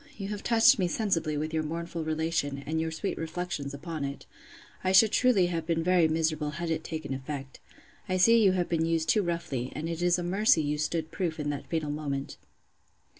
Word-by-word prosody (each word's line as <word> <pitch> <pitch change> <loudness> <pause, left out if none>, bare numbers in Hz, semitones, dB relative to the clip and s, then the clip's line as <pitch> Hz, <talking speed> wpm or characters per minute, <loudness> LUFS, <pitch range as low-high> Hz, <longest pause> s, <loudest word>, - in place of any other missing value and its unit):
you 195 -1 -5
have 205 -1 -4
touched 235 +2 +5
me 180 - +2
sensibly 170 -6 0
with 155 +2 -3
your 160 - +1
mournful 165 +1 -4
relation, 155 -3 -1
and 160 +1 -1
your 160 - -1
sweet 160 +5 -3
reflections 160 -3 -4
upon 155 +2 -5
it. 140 0 -5 0.6
I 185 0 +1
should 215 +3 +7
truly 245 -8 +4
have 165 -2 -3
been 165 -1 0
very 180 -2 +4
miserable 155 -1 0
had 170 -1 -2
it 160 0 -1
taken 155 -4 -5
effect. 135 0 -6 0.5
I 185 - +1
see 230 +5 +5
you 190 -2 +5
have 180 -2 0
been 165 -1 0
used 165 -1 0
too 215 - +4
roughly; 170 -8 -3
and 155 +2 -3
it 165 0 -4
is 175 0 +3
a 175 - -3
mercy 185 -2 +3
you 150 0 -1
stood 160 +1 -2
proof 170 -4 -2
in 145 -1 -1
that 145 - -6
fatal 155 -3 -2
moment. 140 -2 -4
165 Hz, 210 wpm, -28 LUFS, 150-180 Hz, 0.6 s, should